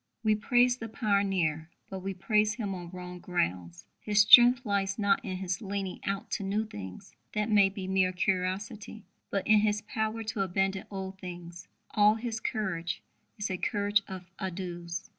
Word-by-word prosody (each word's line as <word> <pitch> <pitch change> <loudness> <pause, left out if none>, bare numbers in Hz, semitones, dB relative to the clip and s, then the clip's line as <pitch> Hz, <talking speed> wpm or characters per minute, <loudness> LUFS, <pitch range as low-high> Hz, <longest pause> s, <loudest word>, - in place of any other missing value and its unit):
We 215 -1 +4
praise 245 +3 +3
the 225 -2 -7
pioneer, 195 -8 0 0.2
but 190 - -6
we 195 +1 -4
praise 210 +2 +2
him 210 -5 -3
on 175 -2 -7
wrong 180 0 -8
grounds. 90 - -2
His 210 -1 +3
strength 245 +4 +8
lies 195 -2 0
not 200 -2 +2
in 185 -2 -4
his 185 +2 -3
leaning 195 -2 -4
out 195 0 -3
to - - -2
new 205 +3 -1
things 100 - -9 0.2
that 210 +1 -1
may 200 -2 +6
be 195 -1 -6
mere 190 -1 +2
curiosity 190 +3 -2 0.2
but 195 - -2
in 215 0 +6
his 210 0 +1
power 220 +1 -2
to 215 -2 -3
abandon 195 +1 0
old 190 -1 -6
things. 175 -1 -9 0.2
All 210 +1 +5
his 225 -1 -4
courage 185 -6 -3 0.3
is 210 -2 -3
a 185 - -2
courage 205 +2 +1
of 185 -2 -7
adieus. 175 -2 -5
195 Hz, 170 wpm, -29 LUFS, 180-210 Hz, 0.3 s, strength